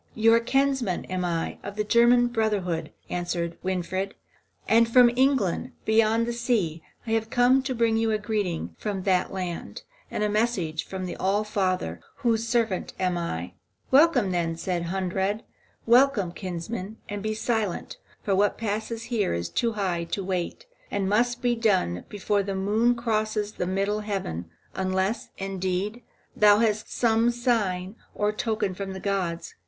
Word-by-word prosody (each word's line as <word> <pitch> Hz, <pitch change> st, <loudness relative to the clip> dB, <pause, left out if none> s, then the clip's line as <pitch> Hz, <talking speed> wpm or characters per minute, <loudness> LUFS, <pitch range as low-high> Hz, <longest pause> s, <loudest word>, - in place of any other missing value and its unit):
"You 225 Hz, +1 st, +5 dB
kinsman 265 Hz, -4 st, +1 dB
am 185 Hz, -1 st, -1 dB
I, 170 Hz, -2 st, -2 dB
of 200 Hz, -, -7 dB
the 210 Hz, -, 0 dB
German 240 Hz, +3 st, +5 dB
brotherhood," 205 Hz, -9 st, -1 dB, 0.2 s
answered 175 Hz, -1 st, -2 dB
Winfried, 190 Hz, +1 st, -2 dB, 0.5 s
"and 230 Hz, +1 st, +4 dB
from 245 Hz, -1 st, +7 dB
England, 260 Hz, -8 st, +1 dB
beyond 225 Hz, +1 st, +3 dB
the 240 Hz, -, -2 dB
sea, 225 Hz, -10 st, 0 dB, 0.2 s
have 225 Hz, -1 st, 0 dB
I -, -, -24 dB
come 250 Hz, +2 st, +4 dB
to 260 Hz, -1 st, -3 dB
bring 230 Hz, -1 st, +2 dB
you 225 Hz, 0 st, +1 dB
a 215 Hz, -, +2 dB
greeting 205 Hz, -, -2 dB
from 200 Hz, -3 st, -3 dB
that 185 Hz, -1 st, +2 dB
land, 180 Hz, -3 st, -5 dB, 0.3 s
and -, -, -2 dB
a -, -, +3 dB
message 205 Hz, -7 st, 0 dB
from 190 Hz, -1 st, -4 dB
the 180 Hz, -, -5 dB
All 200 Hz, +3 st, +1 dB
Father, 185 Hz, -, -1 dB
whose 230 Hz, -1 st, 0 dB
servant 230 Hz, -5 st, 0 dB
I -, -, -1 dB
am." 170 Hz, -, -2 dB, 0.4 s
"Welcome, 265 Hz, -, +5 dB
then," 165 Hz, -2 st, -1 dB
said 175 Hz, 0 st, -2 dB
Hunrad, 190 Hz, +3 st, -1 dB, 0.4 s
"welcome, 235 Hz, -6 st, +4 dB
kinsman, 185 Hz, +4 st, -5 dB
and 205 Hz, 0 st, -4 dB
be 215 Hz, +1 st, -2 dB
silent; 220 Hz, -4 st, -2 dB, 0.3 s
for 195 Hz, -, +1 dB
what 205 Hz, +2 st, +2 dB
passes 220 Hz, +1 st, -3 dB
here 205 Hz, -, +1 dB
is 85 Hz, 0 st, -3 dB
too 230 Hz, -, 0 dB
high 185 Hz, -5 st, -1 dB
to 195 Hz, +3 st, -3 dB
wait, 185 Hz, -, -3 dB, 0.2 s
and 200 Hz, -1 st, -1 dB
must 240 Hz, +5 st, +1 dB
be 245 Hz, -1 st, +3 dB
done 190 Hz, -, +1 dB
before 205 Hz, 0 st, 0 dB
the 195 Hz, 0 st, -3 dB
moon 215 Hz, +5 st, +2 dB
crosses 215 Hz, -2 st, -1 dB
the 180 Hz, -, -3 dB
middle 195 Hz, +3 st, 0 dB
heaven, 190 Hz, -, -4 dB, 0.2 s
unless, 190 Hz, +3 st, -1 dB
indeed, 195 Hz, +3 st, -2 dB, 0.3 s
thou 210 Hz, -1 st, +6 dB
hast 215 Hz, -1 st, 0 dB
some 230 Hz, 0 st, +3 dB
sign 215 Hz, -6 st, 0 dB, 0.2 s
or 210 Hz, 0 st, +1 dB
token 215 Hz, -3 st, -1 dB
from 195 Hz, +1 st, -5 dB
the 190 Hz, -, -6 dB
gods. 185 Hz, -4 st, -2 dB
205 Hz, 160 wpm, -26 LUFS, 185-230 Hz, 0.5 s, from